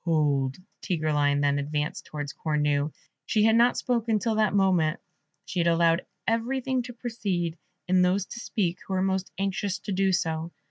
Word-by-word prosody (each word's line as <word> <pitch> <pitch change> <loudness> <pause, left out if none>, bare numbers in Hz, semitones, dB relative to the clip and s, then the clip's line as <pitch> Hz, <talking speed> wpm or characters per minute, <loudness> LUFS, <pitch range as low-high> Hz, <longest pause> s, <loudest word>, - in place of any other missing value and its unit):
"Hold!" 145 -5 +1 0.2
Tigreline 150 -5 +1
then 145 0 +2
advanced 150 +1 -3
towards 145 -2 -5
Cornue; 150 -1 0 0.4
she 215 - +2
had 220 0 +5
not 240 +1 +4
spoken 230 -3 +1
till 220 +2 0
that 215 -1 +2
moment; 180 -5 +3 0.5
she 180 - -3
had 170 - +2
allowed 170 +1 +3 0.2
everything 255 +3 0
to 245 0 -8
proceed, 200 -9 -2 0.3
and 185 0 +4
those 185 +2 +2
to 235 - -8
speak 185 -6 -1
who 190 - -2
were 185 - +1
most 190 0 -1
anxious 195 0 -1
to 205 - -5
do 195 0 +2
so. 165 -2 -1
185 Hz, 170 wpm, -27 LUFS, 155-215 Hz, 0.5 s, had